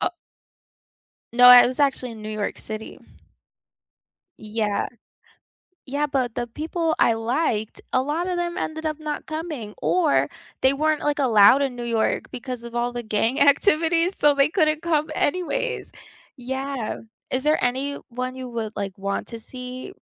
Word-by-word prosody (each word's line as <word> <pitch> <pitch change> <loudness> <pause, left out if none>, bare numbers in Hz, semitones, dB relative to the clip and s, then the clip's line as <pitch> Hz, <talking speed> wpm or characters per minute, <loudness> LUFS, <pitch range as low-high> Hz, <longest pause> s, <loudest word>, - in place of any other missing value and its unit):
O - - +2 1.2
No, 245 +1 +7
I 250 0 +10
was 255 +3 -3
actually 260 -4 +1
in 220 -1 -11
New 215 - -6
York 215 -1 -3
City. 220 0 -7 1.4
Yeah. 215 -1 -1 1.0
Yeah, 285 +3 -1
but 260 -5 -1
the 240 - -2
people 320 +5 -2
I 230 - +4
liked, 225 -1 -1
a 255 - +3
lotta 335 +7 -1
them 345 0 -2
ended 315 -3 -3
up 310 0 -2
not 305 -1 -5
coming, 310 -9 -5
or 340 -5 +2 0.3
they 265 +1 +5
weren't, 310 +2 0
like, 295 0 0
allowed 240 -1 +6
in 270 -3 -1
New 240 - -5
York 230 -2 0
because 245 -1 -6
of 235 0 -9
all 240 0 0
the 240 0 -5
gang 225 +4 0
activity, 325 +3 +4
so 295 -6 +3
they 275 0 +4
couldn't 310 -3 +1
come 315 -2 0
anyways. 475 +10 -1 0.4
Yeah. 265 -1 -4 0.3
Is 260 - 0
there 305 +1 +2
anyone 255 -1 -2
you 260 -1 -7
would, 225 -2 -4
like, 195 -2 -4
want 200 0 -3
to 230 -1 -8
see 255 - -8
260 Hz, 155 wpm, -23 LUFS, 235-310 Hz, 1.4 s, I